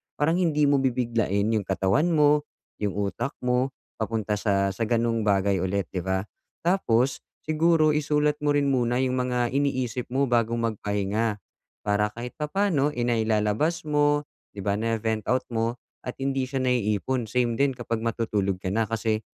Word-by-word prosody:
parang 160 +4 +2
hindi 155 -4 +2
mo 145 0 +4
bibiglain 115 -5 0
yung 105 -3 0
katawan 95 - +2
mo, 150 0 +4 0.3
yung 105 -2 -1
utak 105 +7 -2
mo 125 +2 +1 0.3
papunta 110 -2 -1
sa 100 -2 +1
sa 95 +4 -3
ganong 115 -1 +1
bagay 100 -1 +2
ulit, 95 +1 -1
'di 95 - -2
ba? 95 0 0 0.4
Tapos 135 -8 +2 0.2
siguro 155 0 +3
isulat 150 0 +1
mo 145 - +3
rin 140 -1 +2
muna 120 -2 +1
yung 130 0 0
mga 125 -1 0
iniisip 130 -3 -1
mo 135 +1 +2
bago 115 -1 +2
magpahinga, 105 -1 -1 0.5
para 105 0 +2
kahit 120 +1 -6
papaano, 150 -2 +1
eh, 120 - -2
nailalabas 110 +6 +1
mo 145 0 +3 0.3
'di 100 - -5
ba, 100 +1 0
na-ve-vent 110 -1 -1
out 130 +1 +2
mo 115 0 0 0.3
at 125 - -6
hindi 135 -1 -1
siya 130 0 -2
naiipon. 120 0 0
Same 120 0 0
din 140 -2 +2
kapag 115 -2 -3
matutulog 110 -4 -1
ka 95 - -1
na 110 +2 +1
kasi, 110 0 0
120 Hz, 160 wpm, -26 LUFS, 105-140 Hz, 0.5 s, mo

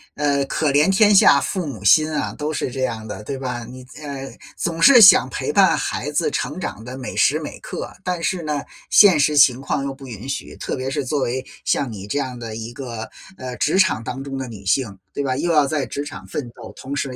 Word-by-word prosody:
呃， 140 -1 +1
可 150 +1 0
怜 145 +5 +3
天 205 +2 +5
下 140 -7 +6
父 185 -4 -3
母 110 -8 -7
心 155 +11 +5
啊， 150 - -2
都 150 +1 -4
是 135 - -3
这 130 - -5
样 115 -3 -3
的， 105 -2 -7
对 135 +2 -4
吧， 125 -3 -5
你， 130 +2 -11 0.2
呃， 140 -2 -7 0.3
总 165 -1 -3
是 255 +1 +8
想 195 - +8
陪 445 - -3
伴 - - +4
孩 - - -3
子 450 - 0
成 150 - -3
长 110 - -5
的 125 +1 -7
每 130 - -6
时 150 +3 +3
每 155 - -8
刻， - - -7
但 180 -2 -2
是 185 0 -1
呢， 150 -2 -2 0.3
现 190 -7 +6
实 150 +1 +2
情 130 -3 +6
况 135 0 -2
又 140 0 -3
不 135 0 -12
允 115 +2 -8
许， 140 - -5
特 - - -4
别 130 +1 -3
是 135 - -2
作 145 +3 -1
为 130 +1 -2 0.2
像 135 -4 0
你 100 -2 -8
这 105 - -2
样 130 -3 -3
的 115 -2 -7
一 115 +1 -6
个， 120 -3 -7 0.3
呃， 125 -1 -7
职 155 +5 +1
场 185 - +3
当 135 +3 -5
中 135 -1 -6
的 130 - -4
女 105 -4 -11
性， 100 -1 0 0.2
对 - - -3
吧？ 135 -2 -1
又 170 +6 -1
要 150 -3 +4
在 150 -1 -1
职 145 - -5
场 145 - -9
奋 130 -5 -5
斗， - - -11
同 140 +2 -6
时 140 - -2
135 Hz, 260 characters per minute, -21 LUFS, 125-150 Hz, 0.3 s, 是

